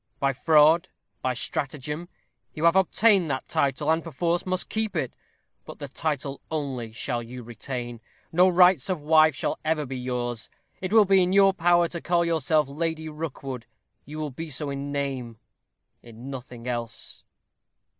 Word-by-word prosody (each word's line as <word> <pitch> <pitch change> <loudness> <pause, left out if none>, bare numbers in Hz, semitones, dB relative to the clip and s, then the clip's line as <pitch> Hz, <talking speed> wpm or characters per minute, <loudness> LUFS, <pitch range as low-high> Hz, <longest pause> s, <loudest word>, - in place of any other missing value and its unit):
By 140 0 +1
fraud, 160 +5 +4 0.3
by 130 -1 -1
stratagem, 150 +6 -3 0.5
you 155 - -4
have 170 +1 +5
obtained 190 -1 +4
that 130 -1 -3
title, 140 +2 +1
and, 160 0 +1
perforce, 170 +2 -1
must 185 0 -1
keep 220 -3 -1
it. 135 -6 -1 0.5
But - - -10
the 145 - -6
title 140 -1 -3
only 135 -7 -3
shall 115 +1 -2
you 120 +2 -9
retain. 120 0 -6 0.3
No 180 +3 +5
rights 180 -3 +5
of 185 -3 0
wife 155 +1 +5
shall - - -2
ever 155 -1 0
be 130 -1 -5
yours. 120 -2 -3 0.3
It 185 0 -3
will 220 -1 +6
be 195 -1 +5
in 180 +1 +1
your 195 0 +6
power 175 -1 +3
to 170 - -5
call 170 0 +2
yourself 155 -2 +2
Lady 160 +2 -2
Rookwood 135 -5 -6 0.4
you 150 +3 -9
will 155 -2 -3
be 160 +5 -6
so 145 0 -2
in 140 +1 -4
name 135 -5 -3 0.6
in 120 +3 -10
nothing 125 -2 -8
else." 120 -2 -4
150 Hz, 165 wpm, -26 LUFS, 130-170 Hz, 0.6 s, will